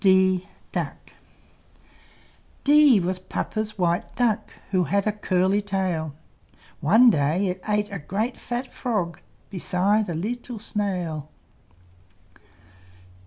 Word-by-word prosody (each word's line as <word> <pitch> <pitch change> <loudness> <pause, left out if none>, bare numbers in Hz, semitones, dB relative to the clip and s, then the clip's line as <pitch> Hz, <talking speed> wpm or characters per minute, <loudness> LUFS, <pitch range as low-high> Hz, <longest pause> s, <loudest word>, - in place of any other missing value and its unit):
D 190 -1 +4 2.2
D 290 -5 +6
was 185 +1 -1
Papa's 215 +3 -4
white 175 -1 0
Duck, 235 -4 +1 0.2
Who 185 -2 +2
had 200 +2 +1
a 215 - +2
curly 195 -1 +1
tail; 185 -7 -2 0.6
One 225 +10 +6
day 155 +4 +1
it 185 -1 -2
ate 210 0 0
a 195 - -4
great 210 - -2
fat 245 +2 -5
frog, 205 -9 -2 0.3
Besides 195 +2 +1
a 170 - -2
leetle 235 +7 -4
snail. 180 -8 -3
195 Hz, 105 wpm, -24 LUFS, 180-215 Hz, 2.2 s, D